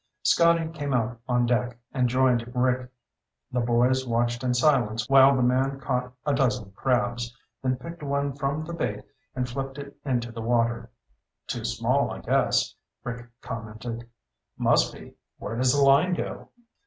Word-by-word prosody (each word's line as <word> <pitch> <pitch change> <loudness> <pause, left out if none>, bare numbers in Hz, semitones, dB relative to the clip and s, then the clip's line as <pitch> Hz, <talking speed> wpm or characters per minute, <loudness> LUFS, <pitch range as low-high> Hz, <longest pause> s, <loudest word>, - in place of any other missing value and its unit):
Scotty 170 -1 +4
came 145 -5 -3
out 120 0 -1
on 120 0 +3
deck 120 0 0 0.2
and 125 -3 +2
joined 125 -2 +2
Rick. 125 0 +1 0.6
The 125 - 0
boys 120 +2 +2
watched 120 +1 0
in 125 -1 +1
silence 120 -5 +2
while 135 0 +7
the 130 - +2
man 135 +2 +1
caught 125 -2 -2
a 145 - +2
dozen 125 -7 0
crabs, 120 +1 -1 0.2
then 130 -1 +1
picked 170 +6 -9
one 140 -1 -1
from 140 +2 -2
the 170 - -6
bait 110 -11 -3 0.3
and 125 -1 -1
flipped 135 +2 -5
it 140 0 -8
into 120 -4 -1
the 115 0 -6
water. 115 0 0 0.6
"Too - - -4
small, - - +1
I - - -5
guess," - - +1 0.3
Rick 125 0 -6
commented. 115 +1 -6 0.5
"Must - - +3
be. - - -12 0.2
Where 110 - -5
does 125 +1 +3
the 140 0 +3
line 140 +7 +5
go?" - - -5
125 Hz, 160 wpm, -26 LUFS, 120-135 Hz, 0.6 s, while